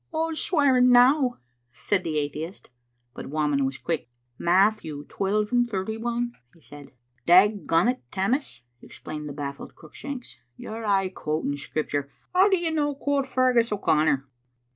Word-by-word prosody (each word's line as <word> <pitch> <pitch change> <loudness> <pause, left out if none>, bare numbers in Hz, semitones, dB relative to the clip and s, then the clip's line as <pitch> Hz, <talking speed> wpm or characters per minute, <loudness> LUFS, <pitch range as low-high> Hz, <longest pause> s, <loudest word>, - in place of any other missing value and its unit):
" - - -47
Wha's 320 0 -1
swearing 265 -7 +3
now?" 250 +1 +5 0.3
said 190 - -1
the 155 -2 -2
atheist 150 +3 -5 0.4
But - - -8
Whamond 145 -2 0
was 135 - -5
quick. 160 -7 -3 0.3
"Matthew, 175 -5 +1
twelve 210 +2 -1
and 240 -1 +2
thirty 200 +1 -3
one," 240 +1 -2 0.2
he - - -21
said. 145 -2 -13 0.4
"Dagont, 205 +5 +4
Tammas," 195 - -2 0.2
exclaimed 150 -1 -8
the - - -6
bafiled 140 -1 -7
Cruick 155 - -16
shanks, 275 -3 -8 0.2
"you're 220 +1 -7
aye 195 -2 +2
quoting 155 -5 -3
Scripture. 145 -1 -3 0.2
How 375 +3 +5
do 380 - +3
you 340 -2 -1
no 290 -2 0
quote 280 -1 -1
Feargus 250 -3 +2
O'Connor?" 155 -8 +1
205 Hz, 145 wpm, -25 LUFS, 155-250 Hz, 0.4 s, now